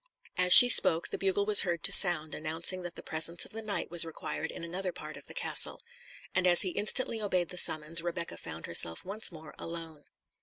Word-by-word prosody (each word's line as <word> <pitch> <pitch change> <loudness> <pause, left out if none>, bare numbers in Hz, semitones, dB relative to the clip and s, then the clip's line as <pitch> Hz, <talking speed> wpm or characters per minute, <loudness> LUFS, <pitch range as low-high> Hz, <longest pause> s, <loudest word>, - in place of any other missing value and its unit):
As 180 0 0
she 245 - +10
spoke, 170 -8 +4
the - - -6
bugle 195 +1 -2
was 210 -1 +6
heard 170 -2 -4
to 195 - +2
sound, 175 -5 +4
announcing 165 +4 -4
that 175 -1 -10
the - - -12
presence 160 +1 -2
of - - -15
the 225 - -8
knight 215 -5 -6
was 175 -1 +4
required 160 -1 -7
in - - -10
another 180 +2 -5
part 155 -2 -11
of 140 - -13
the - - -7
castle; - - 0 0.5
and 185 -1 0
as 175 -1 +5
he 185 - -4
instantly 220 +4 -2
obeyed 185 -4 -3
the - - -9
summons, 155 +2 +1
Rebecca 170 0 -6
found - - -9
herself 80 0 +1
once 200 +3 -2
more 160 -2 -14
alone. 165 -3 -10
175 Hz, 215 wpm, -28 LUFS, 160-190 Hz, 0.5 s, she